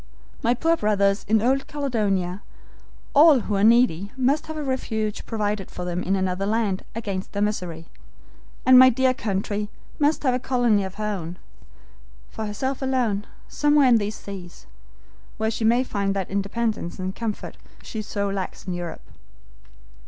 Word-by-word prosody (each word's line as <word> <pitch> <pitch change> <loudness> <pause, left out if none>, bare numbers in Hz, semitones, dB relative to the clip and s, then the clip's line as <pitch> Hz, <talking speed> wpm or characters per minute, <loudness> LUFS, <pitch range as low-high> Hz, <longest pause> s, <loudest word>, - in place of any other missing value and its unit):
My 240 +2 +2
poor 330 +6 +2
brothers 200 -5 +1
in 220 0 +3
old 270 +2 +1
Caledonia, 205 -10 -1 0.7
all 295 -3 +7
who 210 - -3
are 195 - +1
needy 220 -5 +4
must 280 +5 +1
have 315 0 -5
a 305 - -3
refuge 220 -6 -2
provided 210 -3 -2
for 180 - -6
them 175 0 -2
in 190 +1 0
another 190 +1 -1
land 210 -3 0
against 200 -4 -4
their 200 - -2
misery, 180 -6 -3 0.8
and 255 0 +8
my 260 0 +9
dear 260 +1 +2
country 205 -1 -2 0.3
must 300 +1 +2
have 260 -3 +3
a 250 - 0
colony 240 -5 +2
of 190 0 -6
her 215 - -5
own, 180 -5 -4 0.9
for 220 - -4
herself 260 +7 -3
alone, 245 -6 0 0.2
somewhere 295 -2 +3
in 235 - +6
these 210 +1 -3
seas, 190 -5 -9 0.7
where 220 0 0
she 225 0 -2
may 240 +3 +4
find 200 -5 -1
that 190 -2 -3
independence 200 -1 -2
and 185 +1 -4
comfort 225 -3 -4 0.3
she 220 - -5
so 200 -1 -2
lacks 195 -1 -4
in 185 - -3
Europe." 175 -2 -6
215 Hz, 160 wpm, -24 LUFS, 195-250 Hz, 0.9 s, my